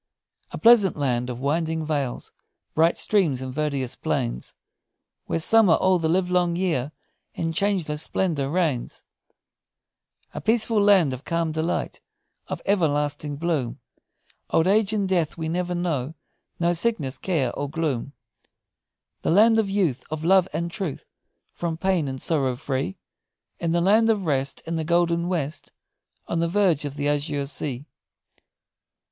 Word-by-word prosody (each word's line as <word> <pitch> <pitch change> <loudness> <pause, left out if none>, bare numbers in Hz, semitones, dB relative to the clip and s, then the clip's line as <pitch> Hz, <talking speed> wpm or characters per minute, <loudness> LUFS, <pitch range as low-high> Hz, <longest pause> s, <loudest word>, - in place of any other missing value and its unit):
"A - - -6
pleasant 225 -7 +5
land 125 -3 0
of 125 -1 -5
winding 160 +3 -1
vales, 140 -5 -3 0.4
bright 165 +2 +3
streams, 175 -11 +2
and 130 -1 -5
verdurous 140 -3 -2
plains, - - -3 0.7
Where - - 0
summer 195 +1 +5
all 185 -1 +2
the 160 -1 0
live 180 +1 +1
long 175 -1 +2
year 160 -7 -1 0.4
in 165 0 -2
changeless 170 -5 0
splendor 160 -7 -1
reigns; 155 -7 -1 1.3
A - - -5
peaceful 225 -1 +2
land 190 -9 +4
of 130 +2 -7
calm 165 -1 -1
delight, 160 +2 -2 0.5
of - - -5
everlasting 150 -5 0
bloom; 150 -6 -2 0.7
Old 160 - +3
age 205 +2 +3
and 205 -3 0
death 175 -5 0
we 160 -1 -3
never 180 +2 -2
know, 160 -5 -2 0.4
no 170 0 +2
sickness, 165 - -1
care, 150 -10 0
or 145 0 -4
gloom; 145 -4 -2 1.1
The - - -1
land 225 +5 +5
of 210 -3 0
youth, 185 -10 0
Of 155 0 -4
love 190 0 +5
and 170 0 -3
truth, 185 -6 -4 0.5
From 165 -2 -3
pain 185 -4 +1
and 130 -1 -5
sorrow 135 -6 0
free, 130 -6 -3 0.6
The 170 0 +1
land 215 +5 +4
of 210 -4 +1
rest, 140 -3 -1
In 165 0 -2
the 160 - -1
golden 170 +1 +1
west, 155 -5 -3 0.6
On 170 - -1
the 170 - +1
verge 180 -6 +2
of 140 -1 -5
the 145 0 -2
azure 145 -1 -1
sea! 140 -2 -5
165 Hz, 145 wpm, -24 LUFS, 145-185 Hz, 1.3 s, pleasant